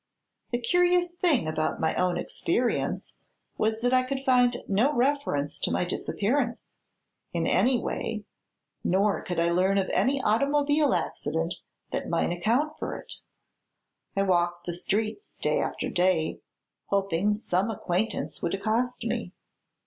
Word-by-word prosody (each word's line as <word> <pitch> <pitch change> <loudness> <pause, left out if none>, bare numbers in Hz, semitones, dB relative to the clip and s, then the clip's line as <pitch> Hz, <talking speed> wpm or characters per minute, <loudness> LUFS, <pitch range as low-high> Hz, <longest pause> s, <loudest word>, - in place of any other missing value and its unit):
The 240 - 0
curious 355 +7 +2
thing 335 - +2
about 155 0 -1
my 160 - +1
own 180 -1 +1
experience - - -1 0.5
was 220 +1 +1
that 245 +1 +2
I 255 - +5
could 265 +1 -4
find 245 -1 +3
no 220 +9 +3
reference 260 - 0
to - - 0
my - - +1
disappearance, 235 +7 -1 0.6
in 170 -1 0
any 245 +10 +3
way, 215 -3 -3 0.6
nor 200 +3 +2
could 175 -2 -3
I 170 0 +2
learn 190 +3 +3
of 190 -1 0
any 275 +2 +2
automobile 285 +5 +2
accident 165 +3 -2 0.3
that - - -3
might 170 0 +1
account 250 - 0
for - - -3
it. - - -8 1.0
I 195 - +2
walked 175 -2 +1
the 175 - -3
streets 215 - -2
day - - +1
after - - -2
day, 180 -3 +1 0.5
hoping 200 0 +1
some 200 -1 0
acquaintance 200 0 -2
would 170 - 0
accost 230 +5 -1
me. - - -2
210 Hz, 140 wpm, -27 LUFS, 175-255 Hz, 1.0 s, I